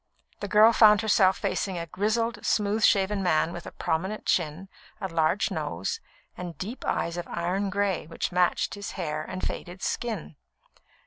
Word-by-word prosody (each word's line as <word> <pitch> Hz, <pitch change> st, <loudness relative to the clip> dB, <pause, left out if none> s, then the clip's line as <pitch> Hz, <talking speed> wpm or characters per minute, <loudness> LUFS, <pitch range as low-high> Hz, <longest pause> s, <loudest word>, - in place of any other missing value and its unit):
The 205 Hz, -, -4 dB
girl 215 Hz, +3 st, +6 dB
found 210 Hz, -3 st, +7 dB
herself 195 Hz, -3 st, +4 dB
facing 195 Hz, -2 st, -2 dB
a 170 Hz, -, -3 dB
grizzled, 215 Hz, +7 st, -1 dB
smooth 210 Hz, +1 st, +1 dB
shaven 195 Hz, 0 st, +3 dB
man 170 Hz, -2 st, +2 dB
with 170 Hz, -, -7 dB
a -, -, -7 dB
prominent 190 Hz, +7 st, -2 dB
chin, 170 Hz, +2 st, 0 dB, 0.3 s
a 195 Hz, -, -2 dB
large 165 Hz, +3 st, +1 dB
nose, 455 Hz, -, -3 dB, 0.4 s
and 175 Hz, -4 st, -7 dB
deep 220 Hz, -, -6 dB
eyes 170 Hz, +1 st, -1 dB
of 175 Hz, -, -4 dB
iron 185 Hz, +4 st, -1 dB
grey 195 Hz, -4 st, -1 dB
which 165 Hz, -, -3 dB
matched 180 Hz, 0 st, +1 dB
his 205 Hz, 0 st, -6 dB
hair 155 Hz, -5 st, -3 dB
and 185 Hz, -, -5 dB
faded 180 Hz, +2 st, -6 dB
skin. 220 Hz, -10 st, -3 dB
190 Hz, 165 wpm, -27 LUFS, 170-210 Hz, 0.4 s, found